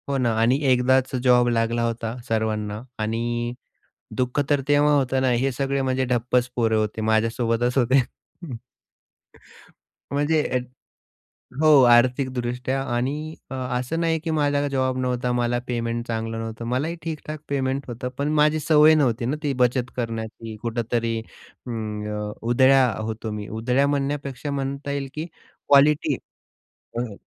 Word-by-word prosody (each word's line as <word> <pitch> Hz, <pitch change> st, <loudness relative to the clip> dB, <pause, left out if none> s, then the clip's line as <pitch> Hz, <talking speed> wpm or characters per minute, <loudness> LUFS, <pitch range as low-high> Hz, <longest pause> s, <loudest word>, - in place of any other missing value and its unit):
हो 140 Hz, -, +1 dB
ना 120 Hz, -3 st, +1 dB
आणि 120 Hz, +4 st, +4 dB
एकदाचं 130 Hz, +1 st, +2 dB
जॉब 125 Hz, -1 st, +4 dB
लागला 115 Hz, 0 st, +1 dB
होता 115 Hz, 0 st, -3 dB
सर्वांना 110 Hz, -2 st, -1 dB, 0.2 s
आणि 120 Hz, +2 st, -2 dB, 0.6 s
दुःख 125 Hz, +2 st, 0 dB
तर 145 Hz, -1 st, +3 dB
तेव्हा 145 Hz, +1 st, +4 dB
होतं 130 Hz, -1 st, +1 dB
ना, 130 Hz, -, +2 dB
हे 125 Hz, +3 st, +1 dB
सगळे 135 Hz, +2 st, -1 dB
म्हणजे 130 Hz, 0 st, 0 dB
ढप्पच 125 Hz, 0 st, +1 dB
पोरे 115 Hz, -2 st, +2 dB
होते 110 Hz, 0 st, -1 dB
माझ्यासोबतच 115 Hz, +3 st, +1 dB
होते. 130 Hz, +2 st, +4 dB, 2.1 s
म्हणजे 145 Hz, +2 st, +2 dB, 1.2 s
हो 155 Hz, -3 st, +7 dB
आर्थिकदृष्ट्या 125 Hz, +1 st, +1 dB
आणि 150 Hz, +6 st, -2 dB, 0.2 s
अ, -, -, -3 dB, 0.2 s
असं 130 Hz, +7 st, -2 dB
नाही 165 Hz, -1 st, +1 dB
की 165 Hz, +1 st, -3 dB
माझा 145 Hz, -2 st, +1 dB
जॉब 130 Hz, -1 st, 0 dB
नव्हता, 125 Hz, -1 st, -1 dB
मला 120 Hz, 0 st, 0 dB
पेमेंट 115 Hz, -1 st, -2 dB
चांगलं 115 Hz, 0 st, -3 dB
नव्हतं, 115 Hz, 0 st, -5 dB
मलाही 130 Hz, +8 st, -1 dB
ठीक-ठाक 155 Hz, -1 st, -5 dB
पेमेंट 135 Hz, 0 st, -1 dB
होतं. 120 Hz, +1 st, -4 dB
पण 145 Hz, +1 st, -1 dB
माझी 155 Hz, +1 st, +3 dB
सवय 155 Hz, +1 st, +6 dB
नव्हती 125 Hz, -6 st, +1 dB
ना 130 Hz, +5 st, 0 dB
ती 145 Hz, -2 st, 0 dB
बचत 125 Hz, 0 st, +1 dB
करण्याची. 115 Hz, -1 st, -4 dB
कुठेतरी 115 Hz, 0 st, -1 dB, 0.5 s
ऊं, 110 Hz, -3 st, -4 dB
अ, 105 Hz, 0 st, -4 dB
उधळ्या 130 Hz, +3 st, +5 dB
होतो 110 Hz, 0 st, -4 dB
मी. 105 Hz, -1 st, -5 dB
उधळ्या 125 Hz, +5 st, +1 dB
म्हणण्यापेक्षा 140 Hz, -1 st, -2 dB
म्हणता 140 Hz, +1 st, -3 dB
येईल 140 Hz, -1 st, -3 dB
की 155 Hz, +1 st, -3 dB
क्वालिटी 145 Hz, +1 st, +2 dB, 0.8 s
हं 120 Hz, -3 st, -3 dB
125 Hz, 135 wpm, -23 LUFS, 115-140 Hz, 2.1 s, हो